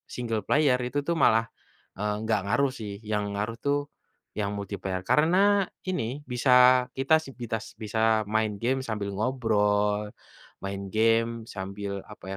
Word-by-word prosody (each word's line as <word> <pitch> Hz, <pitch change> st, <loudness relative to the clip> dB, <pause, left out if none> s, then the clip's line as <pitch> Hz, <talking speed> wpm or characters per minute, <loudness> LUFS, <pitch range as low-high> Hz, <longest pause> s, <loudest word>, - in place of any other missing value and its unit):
single 115 Hz, -3 st, -2 dB
player 145 Hz, -3 st, +3 dB
itu 125 Hz, +4 st, -1 dB
tuh 170 Hz, -, +1 dB
malah, 115 Hz, +1 st, +4 dB, 0.5 s
eee, 105 Hz, +2 st, -1 dB
enggak 110 Hz, 0 st, +1 dB
ngaruh 135 Hz, +8 st, +2 dB
sih. 100 Hz, -2 st, -6 dB
Yang 105 Hz, -1 st, 0 dB, 0.2 s
ngaruh 115 Hz, +2 st, -3 dB
tuh 145 Hz, 0 st, +2 dB, 0.6 s
yang 100 Hz, -1 st, -1 dB
multiplayer, 95 Hz, -2 st, -4 dB
karena 160 Hz, +4 st, +3 dB, 0.5 s
ini 185 Hz, -10 st, -1 dB, 0.3 s
bisa 125 Hz, +2 st, +1 dB, 0.5 s
kita 135 Hz, +4 st, +4 dB
si 135 Hz, -, -10 dB
bitas 115 Hz, -2 st, -4 dB
bisa 110 Hz, +1 st, -3 dB, 0.4 s
main 110 Hz, -1 st, +2 dB
game 130 Hz, +3 st, +1 dB
sambil 105 Hz, -4 st, -3 dB
ngobrol, 105 Hz, -3 st, +1 dB, 0.5 s
main 100 Hz, 0 st, -4 dB
game 115 Hz, +1 st, +2 dB
sambil 100 Hz, +1 st, -5 dB, 0.2 s
apa 105 Hz, -, -12 dB
110 Hz, 140 wpm, -27 LUFS, 105-125 Hz, 0.6 s, malah